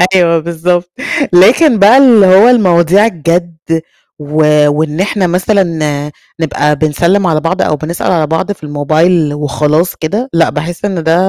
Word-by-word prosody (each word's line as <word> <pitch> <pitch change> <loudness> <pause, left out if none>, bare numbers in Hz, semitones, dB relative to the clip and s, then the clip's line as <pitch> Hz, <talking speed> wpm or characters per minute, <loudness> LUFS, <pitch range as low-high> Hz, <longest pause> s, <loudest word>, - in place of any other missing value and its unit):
أيوه، 170 -2 +2
بالضبط. 175 +2 -3 0.4
لكن 235 - +4
بقى 210 +6 +5
اللي 240 -7 +5
هو 190 +5 +5
المواضيع 190 -4 +3
الجَد، 170 -3 -2 0.6
و 150 0 +1
وإن 150 +2 -2
إحنا 195 -1 -1
مثلًا 185 +3 0 0.8
نبقى 150 -2 -1
بنسلّم 170 +6 0
على 160 -2 0
بعض، 175 +4 -2
أو 155 - 0
بنسأل 160 +4 -4
على 160 -4 0
بعض 160 +6 -2
في 170 -6 -8
الmobile 155 +2 0
وخلاص 150 +3 -1
كده، 210 +12 -4
لأ، 165 0 +2
باحس 170 +5 -5
إن 190 -5 -3
ده 160 - +1
170 Hz, 150 wpm, -11 LUFS, 155-190 Hz, 0.8 s, بقى